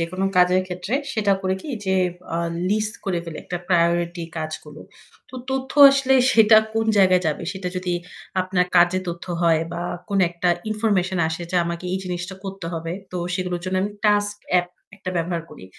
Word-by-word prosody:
যেকোনো 185 Hz, +3 st, -2 dB
কাজের 180 Hz, +1 st, +5 dB
ক্ষেত্রে 180 Hz, +6 st, -4 dB, 0.2 s
সেটা 205 Hz, -3 st, +2 dB
করে 190 Hz, 0 st, 0 dB
কি -, -, -8 dB, 0.2 s
যে 190 Hz, 0 st, +2 dB, 0.3 s
অ্যাঁ 170 Hz, 0 st, -1 dB, 0.2 s
লিস্ট 215 Hz, +1 st, 0 dB
করে 185 Hz, -3 st, 0 dB
ফেলে 165 Hz, -2 st, -7 dB
একটা 180 Hz, -, -4 dB
প্রায়োরিটি 170 Hz, -1 st, +1 dB, 0.2 s
কাজগুলো। 155 Hz, -1 st, -7 dB, 0.5 s
তো -, -, -14 dB, 0.2 s
তথ্য 265 Hz, 0 st, -2 dB, 0.2 s
আসলে 275 Hz, -1 st, +2 dB, 0.2 s
সেটা 220 Hz, -1 st, +7 dB, 0.2 s
কোন 225 Hz, 0 st, +1 dB
জায়গায় 185 Hz, -2 st, +5 dB
যাবে, 155 Hz, +1 st, -1 dB
সেটা 190 Hz, -2 st, -4 dB
যদি 180 Hz, -1 st, -1 dB, 0.5 s
আপনার 185 Hz, -1 st, +1 dB
কাজে 175 Hz, +1 st, +5 dB
তথ্য 170 Hz, 0 st, -5 dB, 0.2 s
হয় 165 Hz, -2 st, +3 dB
বা 170 Hz, -, -4 dB, 0.3 s
কোন 200 Hz, -2 st, 0 dB
একটা 175 Hz, +1 st, -1 dB, 0.2 s
ইনফরমেশন 200 Hz, -4 st, 0 dB
আসে 160 Hz, +2 st, -4 dB
যা -, -, +2 dB
আমাকে 170 Hz, +1 st, -4 dB
এই 190 Hz, -, 0 dB
জিনিসটা 180 Hz, +1 st, -4 dB
করতে 195 Hz, -3 st, -6 dB
হবে। 165 Hz, 0 st, -4 dB, 0.2 s
তো 180 Hz, -, -3 dB, 0.2 s
সেগুলোর 180 Hz, -2 st, -2 dB
জন্য 185 Hz, 0 st, -1 dB
আমি 205 Hz, -, -1 dB, 0.2 s
টাস্ক 205 Hz, 0 st, +2 dB, 0.2 s
এ্যাপ 180 Hz, -1 st, +3 dB, 0.3 s
একটা 190 Hz, -2 st, -5 dB
ব্যবহার 170 Hz, 0 st, -1 dB
করি। -, -, -12 dB
180 Hz, 180 wpm, -22 LUFS, 170-195 Hz, 0.5 s, সেটা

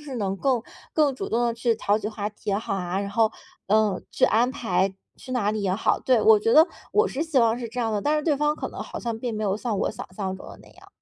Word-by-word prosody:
是 290 Hz, -3 st, -8 dB
能 195 Hz, -3 st, -1 dB
够 250 Hz, +1 st, +1 dB, 0.3 s
更 300 Hz, -3 st, +3 dB
主 -, -, -5 dB
动 235 Hz, +2 st, +1 dB
地 235 Hz, -, 0 dB
去 230 Hz, 0 st, +1 dB
调 210 Hz, -1 st, +1 dB
起 215 Hz, -, -5 dB
话 210 Hz, -1 st, -4 dB
题 210 Hz, 0 st, -6 dB
也 195 Hz, -, +2 dB
好 215 Hz, -2 st, -3 dB
啊， 180 Hz, +1 st, -2 dB
然 200 Hz, 0 st, -4 dB
后 220 Hz, +1 st, +3 dB, 0.4 s
嗯， 210 Hz, -2 st, +2 dB
去 -, -, +3 dB
安 235 Hz, +3 st, +3 dB
排 195 Hz, -6 st, 0 dB, 0.2 s
去 255 Hz, -, -9 dB
哪 215 Hz, -5 st, +1 dB
里 215 Hz, 0 st, -2 dB
也 190 Hz, -1 st, +1 dB
好 215 Hz, -, +1 dB
对， 255 Hz, -3 st, +3 dB
我 220 Hz, 0 st, +7 dB
觉 225 Hz, +2 st, +1 dB
得 310 Hz, +4 st, +8 dB, 0.3 s
我 430 Hz, +1 st, +3 dB
是 270 Hz, -, -5 dB
希 315 Hz, -4 st, +1 dB
望 230 Hz, 0 st, +3 dB
是 235 Hz, -2 st, -5 dB
这 245 Hz, +2 st, -4 dB
样 225 Hz, -, 0 dB
的， 210 Hz, -, 0 dB
但 300 Hz, +1 st, +2 dB
是 300 Hz, -, 0 dB
对 300 Hz, -2 st, +2 dB
方 300 Hz, +1 st, +1 dB
可 -, -, -5 dB
能 -, -, -9 dB
好 -, -, -9 dB
像 230 Hz, -2 st, -3 dB
并 240 Hz, -1 st, -3 dB
没 215 Hz, -, -3 dB
有 200 Hz, 0 st, +1 dB
像 225 Hz, -2 st, -2 dB
我 -, -, 0 dB
想 -, -, -8 dB
象 190 Hz, -1 st, -3 dB
中 -, -, -12 dB
的 -, -, -11 dB
那 -, -, -17 dB
样。 -, -, -18 dB
225 Hz, 310 characters per minute, -25 LUFS, 205-250 Hz, 0.4 s, 得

